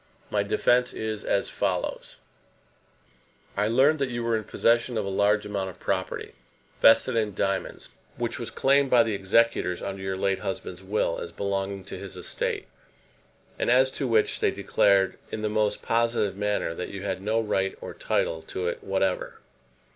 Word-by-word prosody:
My 105 - +2
defence 125 +5 +2
is 110 -1 -4
as 100 - 0
follows: - - -2 1.4
I 105 +1 +1
learned 135 +7 +4
that 135 -2 0
you 120 -1 -3
were 115 -1 +1
in 110 -1 -2
possession 120 +2 +2
of 105 - -1
a - - -2
large 105 +2 +2
amount 100 -2 -3
of 90 - -12
property, - - -3 0.5
vested 115 +2 +6
in 105 -4 0
diamonds, 100 - -2 0.3
which - - -2
was - - -4
claimed 140 0 +3
by 120 -2 +6
the 110 -1 -2
executors 100 -2 +2
under 95 -1 -5
your 95 0 -3
late 95 0 0
husband's 95 -1 -5
will 95 -3 -1
as 85 - -6
belonging 100 +1 -3
to - - -7
his - - -8
estate; - - -3 0.9
and - - 0
as 130 +2 +5
to 135 - -2
which 110 -3 +2
they - - +3
declared, 100 -1 +2
in 110 - -4
the 105 - +1
most 105 -1 0
positive 115 -4 +1
manner, 105 -4 -1
that 90 - -5
you 100 -1 -7
had 100 -1 -2
no 110 +3 +1
right 95 -3 -1
or - - -7
title 80 -1 -1
to 90 +2 -4
it 85 - -3
whatever. 95 -1 -1
105 Hz, 175 wpm, -26 LUFS, 95-115 Hz, 1.4 s, vested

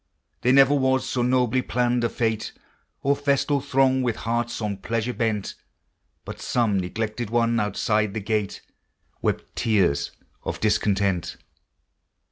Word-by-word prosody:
There 125 - +3
never 135 +1 +6
was 130 -2 +2
so 125 - -1
nobly 125 0 +2
planned 125 -1 0
a 115 - +2
fête, 110 -2 -2 0.5
Or 140 +1 +3
festal 140 0 +1
throng 130 -1 +2
with 120 -3 0
hearts 120 +1 -2
on 105 -3 -2
pleasure 115 +4 -2
bent, 110 -4 -1 0.7
But - - -8
some 110 -5 +1
neglected 110 +4 -3
one 115 0 +2
outside 105 0 0
the - - -1
gate 105 -1 -2 0.6
Wept - - -2
tears 100 - +1 0.3
of - - -4
discontent. 100 -4 +1
115 Hz, 130 wpm, -24 LUFS, 105-125 Hz, 0.7 s, never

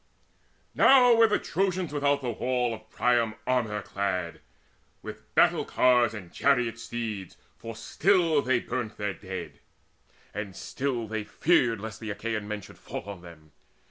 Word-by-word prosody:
Now 250 -3 +7
were 230 0 +6
the 210 - +2
Trojans 185 -2 -1
all - - -10
without 140 0 +2
the 120 -2 -2
town 125 0 0
Of 110 - -11
Priam, 120 -3 +1
armour 110 -5 0
clad, 90 -4 -3 0.6
with - - -10
battle - - +4
cars 125 -2 +3
And 90 -5 -10
chariot 125 -5 +1
steeds; 110 -5 -5 0.2
for 115 -1 -7
still 165 - +2
they 130 -2 +2
burnt 120 -4 -4
their 105 -1 -2
dead, 95 -1 -7 0.7
And 100 -2 -5
still 130 -4 -3
they 110 0 -3
feared 120 - +2
lest 110 0 -7
the 110 - -6
Achaean 105 0 -3
men 105 -1 -4
Should - - -14
fall - - -6
on 100 -2 -8
them. 80 -3 -14
115 Hz, 155 wpm, -27 LUFS, 105-130 Hz, 0.7 s, Now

